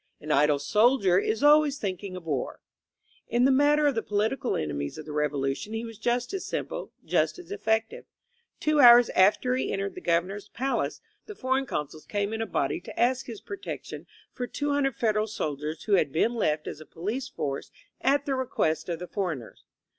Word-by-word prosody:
An 155 - -5
idle 145 0 +4
soldier 200 - +3
is 220 +5 -1
always 295 -1 +5
thinking 190 -2 -4
of 180 - -8
war/' 145 -6 -3 0.7
In 240 +2 +2
the 270 - +5
matter 290 +2 +4
of 285 - +3
the 225 - -1
political 220 +6 -1
enemies 70 -2 -3
of 155 - -8
the 155 - -7
Revolu 145 -2 0
tion 210 +7 -8
he 225 +1 -3
was 225 -2 -10
just 240 - -1
as 390 - -3
simple, - - -4
just - - +1
as 360 +1 -12
effective. 225 - -1 0.5
Two 305 -1 +2
hours 240 -2 +9
after 215 +6 +3
he 260 - -1
entered 195 0 -2
the - - -9
Governor's 185 +5 -1
palace 270 +2 -2 0.3
the 420 - -8
for 260 -6 -1
eign 270 0 0
consuls 150 -2 -5
came 205 +1 -1
in 225 - -2
a 225 - -2
body - - -1
to - - -9
ask 255 +2 +2
his 230 -4 -8
protection 400 0 -7 0.3
for 245 -1 -4
SOO 285 -1 0
Federal 215 -3 0
soldiers 155 -6 -4
who 210 - -1
had 180 -7 +3
been 195 - +1
left 155 -10 0
as 150 - -7
a - - -10
police 215 +10 -4
force 145 - -4 0.3
at 280 +2 +2
the 275 - 0
request 240 -12 -1
of 170 - -1
the 180 +2 -7
foreigners. 170 - -4
220 Hz, 195 wpm, -27 LUFS, 165-260 Hz, 0.7 s, hours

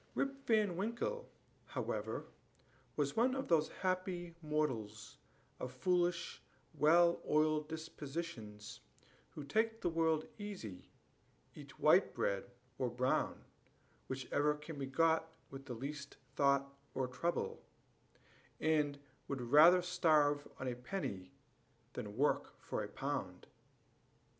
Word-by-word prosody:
Rip 275 0 -2
Van 215 -5 +3
Winkle, 235 - -2 0.4
however, - - -3 0.7
was 145 -2 0
one 250 +3 +3
of 270 - -3
those 155 -2 +4
happy 185 -2 -2
mortals, 130 -9 -2 0.4
of 125 - -4
foolish, 175 +5 0 0.3
well 170 +3 +5
oiled 155 0 +3
dispositions, 150 -9 -6 0.5
who 150 - -8
take 225 +9 +1
the 175 - 0
world 160 -1 +2
easy, 185 - -7 0.6
eat - - -12
white - - +5
bread 100 +4 -1 0.3
or 125 - +1
brown, 125 +2 0 0.6
whichever 145 +3 0
can 150 0 -8
be 135 - -2
got 160 +3 +2 0.2
with 135 0 -9
least 140 +4 -5 0.2
thought 140 -1 +3 0.2
or 130 -1 0
trouble, 145 +8 -2 1.0
and 150 -2 +2 0.3
would 140 -2 -3
rather 170 +5 +8
starve 150 -5 +3
on 130 - -3
a 125 - 0
penny 120 - -4 0.6
than 105 +1 -6
work 145 +3 +1
for - - -3
a - - -4
pound. - - -4
150 Hz, 115 wpm, -36 LUFS, 135-175 Hz, 1.0 s, rather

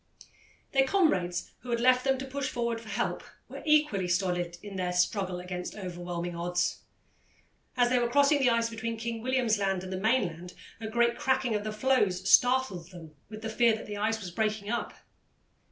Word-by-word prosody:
Their 270 -1 +3
comrades 190 - +1
who 250 - -11
had 235 -1 0
left 255 +1 +4
them 270 -1 +2
to 265 - -5
push 270 0 -3
forward 235 -1 -2
for 220 - -12
help 220 +4 -2 0.2
were - - -9
equally 300 -12 +3
stolid 175 -1 -1
in 205 -2 -8
their 180 -1 -1
struggle 180 0 0
against 180 0 -6
overwhelming 175 -2 -5
odds. 175 +1 -1 1.0
As 245 -1 +4
they 250 - +4
were 240 -1 0
crossing 285 +2 +4
the 265 -2 +4
ice 230 0 +2
between 230 0 -4
King 230 0 -4
William's 245 -4 +1
Land 195 -2 0
and 190 0 -6
the - - -2
mainland, 185 -6 0 0.2
a 225 - -5
great 235 +1 +1
cracking 260 -3 +1
of 210 -1 -1
the 215 - -3
floes 210 -6 +1
startled 245 -9 +3
them 165 -4 -12 0.2
with 215 0 -9
the - - -2
fear 230 0 +4
that 220 - -8
the 205 -1 -6
ice 220 +2 0
was 185 -4 -7
breaking 215 +1 -1
up. 235 - -3
220 Hz, 190 wpm, -29 LUFS, 180-245 Hz, 1.0 s, left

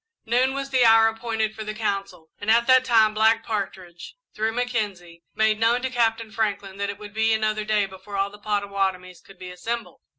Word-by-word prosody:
Noon 255 +4 +1
was 275 0 -4
the 255 -2 +4
hour 225 -1 +6
appointed 225 -1 -2
for 220 - -7
the 215 0 -6
council, 195 -6 -4
and 205 - -4
at 235 +1 +4
that 260 0 +5
time 225 -4 +4
Black 225 +1 +3
Partridge, 190 -5 -5 0.2
through 220 +1 -1
Mackenzie, 205 -8 -3
made 220 0 +2
known 235 +2 +2
to 260 - -2
Captain 225 -2 0
Franklin 205 -3 -2
that 200 0 -2
it 200 - -5
would 210 0 -11
be 220 +1 +2
another 215 0 -1
day 210 -1 +1
before 190 +1 -9
all 195 +1 0
the 210 - -14
Pottawattomies 195 -3 -2
could 195 - -17
be 180 0 -9
assembled. 230 +6 -5
215 Hz, 200 wpm, -24 LUFS, 200-225 Hz, 0.2 s, hour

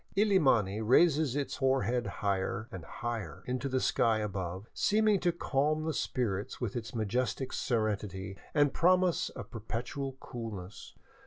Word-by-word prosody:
Illimani 135 - +3
raises 145 +3 +4
its 145 -1 -2
hoar 135 -2 +2
head 120 +2 0
higher 100 +2 -1
and 95 -3 -7
higher 100 -8 -5
into 130 +2 -2
the 130 0 +1
sky 115 -3 +2
above, 95 -2 -3
seeming 215 -1 +3
to 175 -1 +2
calm 155 -1 0
the 160 0 -1
spirits 105 -8 -2
with 120 -5 -3
its 120 +1 -5
majestic 125 +4 -1
serenity 100 -5 -1 0.2
and 145 -2 +4
promise 180 0 +3
of - - -9
perpetual 120 +4 -4
coolness. 105 -6 -7
120 Hz, 140 wpm, -31 LUFS, 105-145 Hz, 0.2 s, raises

